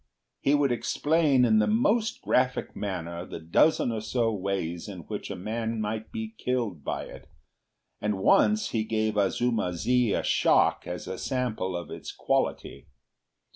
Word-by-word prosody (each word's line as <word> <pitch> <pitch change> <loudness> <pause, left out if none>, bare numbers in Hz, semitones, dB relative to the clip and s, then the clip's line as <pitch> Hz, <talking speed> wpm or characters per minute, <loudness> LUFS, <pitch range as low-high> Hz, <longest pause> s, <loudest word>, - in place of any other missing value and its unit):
He 140 - +3
would 145 -2 +2
explain 145 +1 +2
in 110 -2 +4
the 105 - +3
most 205 - +1
graphic 125 0 +1
manner 85 -4 -4
the 85 - -8
dozen 100 - +3
or 110 -1 -3
so 115 +1 0
ways 95 -4 -3
in 95 -3 -7
which - - -6
a - - -4
man 110 +4 -3
might 110 +1 -3
be 110 0 -5
killed 115 - -2
by - - -3
it, - - -11 0.7
and 105 -1 0
once 205 - +3
he 110 -2 0
gave 110 -1 -1
Azuma 105 -1 +1
zi 125 +4 +2
a - - 0
shock - - +3
as 90 0 -5
a 95 0 -5
sample 115 -8 -2
of 85 -4 -7
its - - -7
quality. 70 +2 -2
110 Hz, 160 wpm, -27 LUFS, 95-125 Hz, 0.7 s, in